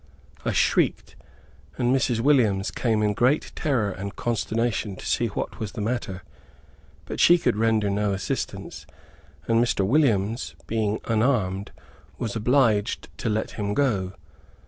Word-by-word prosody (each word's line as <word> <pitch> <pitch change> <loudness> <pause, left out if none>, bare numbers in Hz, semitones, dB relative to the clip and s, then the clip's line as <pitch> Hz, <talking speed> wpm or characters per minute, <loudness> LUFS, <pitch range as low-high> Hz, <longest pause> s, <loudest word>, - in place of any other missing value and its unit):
I - - 0
shrieked, - - +1 0.6
and 125 +1 +2
Mrs. 120 -3 +1
Williams 115 -8 +3
came 110 -3 0
in 105 -1 +2
great 130 +8 +1
terror 120 -9 0
and 100 +1 -6
consternation, 115 -3 -1
to - - -10
see - - +1
what - - -5
was 110 -3 -4
the 120 - -6
matter. 105 -4 -3 0.8
But - - -6
she 175 - +7
could 165 - +1
render 110 -1 +2
no 100 +1 0
assistance, 95 -1 -4 0.6
and 115 0 +4
Mr. 100 -5 +1
Williams, 115 -3 +1
being 110 -1 -1
unarmed, 110 -5 0 0.5
was 110 -2 -3
obliged 110 -2 +1
to - - -1
let 110 +1 -1
him 105 -1 -3
go. 100 -10 +1
110 Hz, 140 wpm, -25 LUFS, 100-120 Hz, 0.8 s, she